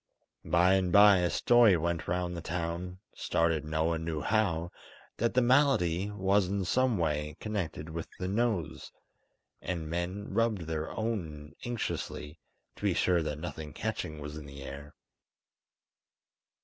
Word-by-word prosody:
By 90 +2 +4
and 95 -2 +2
bye 100 +1 +8
a 90 -1 +1
story 120 -4 +5
went 85 +1 -2
round 90 0 -1
the 85 - -5
town, 85 +2 -4 0.2
started 80 -2 0
no 80 +1 -1
one 80 0 0
knew 80 -2 -3
how, 90 -4 0 0.5
that 115 +1 0
the 125 - +4
malady 120 - +3
was 100 -1 +2
in 100 0 -1
some 125 +4 +2
way 75 -2 -1
connected 95 -8 -4
with 80 0 -5
the 90 - -3
nose; 100 -6 -1 0.7
and 85 -3 -3
men 90 +4 -3
rubbed 115 -5 +1
their 80 -1 -3
own 80 -10 -4
anxiously, 105 -9 -4 0.4
to - - -14
be - - +1
sure 90 -2 +3
that 75 -2 -3
nothing 80 -2 -6
catching 80 -1 -4
was 75 0 -7
in 75 -2 -9
the 70 0 -9
air. 70 +2 -9
85 Hz, 150 wpm, -30 LUFS, 80-100 Hz, 0.7 s, bye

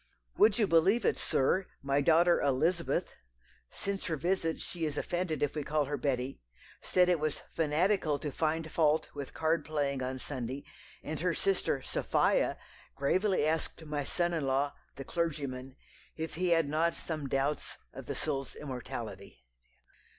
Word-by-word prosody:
Would 215 -1 +5
you 220 - +4
believe 190 +6 +4
it, - - +3
sir, 185 +8 +1 0.2
my 140 +1 +2
daughter 170 +3 +5
Elizabeth 160 +6 +1 0.6
(since 200 -1 -3
her 165 - 0
visit 165 +1 0
she 170 -2 -4
is 150 -2 -1
offended 175 -2 -1
if 145 - +1
we 150 - -2
call 150 0 +1
her 145 +2 -2
Betty) 130 -1 -2 0.4
said 180 -1 +3
it 175 -2 +3
was 155 -1 -2
fanatical 160 0 +2
to 145 +1 -4
find 160 +2 -1
fault 155 -1 +2
with 140 -2 -7
card 160 +1 +1
playing 145 -3 -1
on 130 +1 -2
Sunday; 130 0 -5 0.4
and - - -4
her - - +1
sister 390 0 +1
Sophia - - +2 0.4
gravely 190 -4 +2
asked 160 +1 -1
my 150 -1 -2
son 175 +4 0
in 155 -5 -1
law, 140 +2 +1 0.2
the 135 - -7
clergyman, 140 -6 -3 0.4
if 160 0 -4
he 180 +2 0
had 165 -3 +4
not 160 +3 +1
some 155 -4 -4
doubts 135 +2 -1 0.2
of - - -9
the - - -3
soul's 140 -3 -3
immortality?" 110 - -7
155 Hz, 160 wpm, -31 LUFS, 140-170 Hz, 0.6 s, Would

